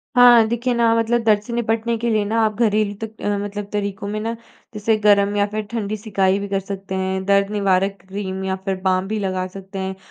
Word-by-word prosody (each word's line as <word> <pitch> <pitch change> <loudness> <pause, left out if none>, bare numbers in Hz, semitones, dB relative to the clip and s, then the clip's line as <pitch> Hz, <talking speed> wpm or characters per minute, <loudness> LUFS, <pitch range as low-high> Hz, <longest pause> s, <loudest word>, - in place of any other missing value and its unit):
हाँ, 240 -2 +7
देखिए 240 +2 -1
ना 235 -1 +3
मतलब 230 +1 +1
दर्द 210 -2 +3
से 235 +3 -8
निपटने 230 0 0
के 235 +1 -1
लिए 215 -2 +2
ना 225 +3 0
आप 215 -1 -1
घरेलू 215 -2 +2
तक 220 0 -8
अ, 205 0 0
मतलब 205 0 -5
तरीकों 200 -1 -3
में 210 +1 -3
ना 225 +2 -2 0.4
जैसे 215 +1 +1
गर्म 205 0 +4
या 205 0 +3
फिर 215 0 -2
ठंडी 215 -2 -2
सिकाई 195 -2 +1
भी 200 - -4
कर 195 0 0
सकते 195 0 -6
हैं। 190 0 -1
दर्द 200 0 +2
निवारक 195 -1 +1
क्रीम 190 -1 -4
या 190 0 -1
फिर 195 -1 0
बाम 185 0 +2
भी 215 +1 -2
लगा 185 -2 -2
सकते 195 +1 -9
हैं 190 0 -3
205 Hz, 225 wpm, -21 LUFS, 195-220 Hz, 0.4 s, हाँ